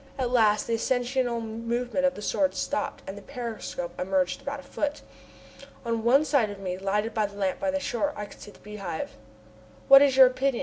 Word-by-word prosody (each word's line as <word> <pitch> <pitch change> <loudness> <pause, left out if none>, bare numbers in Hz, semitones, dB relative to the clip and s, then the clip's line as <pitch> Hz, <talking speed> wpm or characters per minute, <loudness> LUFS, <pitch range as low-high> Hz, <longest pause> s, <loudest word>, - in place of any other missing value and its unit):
At 250 -2 -1
last 215 -4 +3
the 230 - -2
ascensional 245 0 0
movement 235 +4 -1
of 270 - -2
the 210 - -8
Sword 285 +5 +1
stopped, 285 -1 -3
and 195 - -6
the 205 - -10
periscope 225 -8 -6
emerged 185 +4 0
about 280 +1 -5
a - - -11
foot. 295 0 -3 0.8
On 230 -1 -1
one 270 +6 +4
side 265 -9 +2
of 205 - -7
me, 185 -2 -4
lighted 205 +3 -1
by 215 -2 +1
the 200 0 -13
lamp 195 -2 -1
by 290 - -1
the 285 0 0
shore, 285 +2 -1
I 210 - -5
could - - -15
see - - -10
the - - -16
Beehive. 200 -6 -6 0.8
"What 275 0 +10
is 275 -2 +4
your 265 - +10
opinion?" 255 0 0
235 Hz, 210 wpm, -27 LUFS, 205-275 Hz, 0.8 s, What